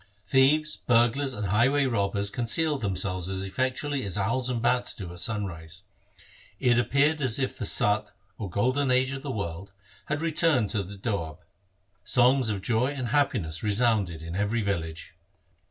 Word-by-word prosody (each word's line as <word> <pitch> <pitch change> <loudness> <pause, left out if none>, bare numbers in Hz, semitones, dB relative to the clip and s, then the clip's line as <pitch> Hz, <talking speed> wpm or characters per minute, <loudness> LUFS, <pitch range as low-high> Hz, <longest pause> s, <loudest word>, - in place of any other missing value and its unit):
Thieves, 150 +3 +3
burglars, 125 +3 +2
and 105 - -3
highway 130 +8 +3
robbers 100 -4 0
concealed 145 +4 0
themselves 95 -2 -1
as 95 0 -3
effectually 130 +6 -2
as 100 0 -2
owls 115 +6 0
and 125 -2 -1
bats 120 +1 +1
do 90 -5 -7
at 90 - -8
sunrise. 85 -7 -3 0.8
It 120 -1 +3
appeared 140 +6 +2
as 130 -5 +4
if 135 -2 -2
the 105 - -4
Sat, 105 0 +2 0.3
or 100 -4 -4
golden 130 +9 0
age 130 +1 +2
of 135 -1 -5
the 145 - -6
world, 100 -4 -5 0.3
had 150 +1 -2
returned 160 - +2
to 110 - 0
the 100 +2 -9
Doab. 90 -7 -3 0.7
Songs 125 -1 +3
of 100 -3 -3
joy 120 +2 +2
and 135 -4 -3
happiness 105 - 0
resounded 105 -6 +1
in 85 +1 -6
every 105 +3 0
village. 80 -5 -4
115 Hz, 160 wpm, -27 LUFS, 100-130 Hz, 0.8 s, as